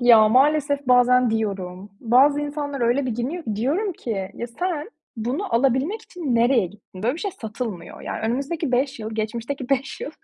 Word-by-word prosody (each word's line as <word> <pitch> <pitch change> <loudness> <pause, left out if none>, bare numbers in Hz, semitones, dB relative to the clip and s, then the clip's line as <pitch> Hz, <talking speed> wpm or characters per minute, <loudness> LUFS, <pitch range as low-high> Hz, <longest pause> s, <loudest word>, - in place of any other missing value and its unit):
Ya, 230 -3 +7
maalesef 285 +2 +3
bazen 250 -1 +5
diyorum. 200 -3 -3
Bazı 270 +5 +4
insanlar 290 -1 -3
öyle 245 +3 +2
bir - - -1
giyiniyor 280 +9 -3
ki. 215 -2 -3
Diyorum 330 - 0
ki, 200 - -4
ya, 235 - -4
sen 320 - -3 0.3
bunu 250 - -2
alabilmek 270 - +1
için 320 - -3
nereye 235 -3 +4
gittin? 190 0 -13
Böyle 240 +5 +1
bir 330 - -7
şey 405 - -2
satılmıyor. 220 - -6
Yani, - - -5
önümüzdeki 275 +5 -2
5 265 +1 +1
yıl, 220 0 -5
geçmişteki 235 +4 -3
5 270 -1 -1
yıl 290 - -4
250 Hz, 175 wpm, -23 LUFS, 225-285 Hz, 0.3 s, Ya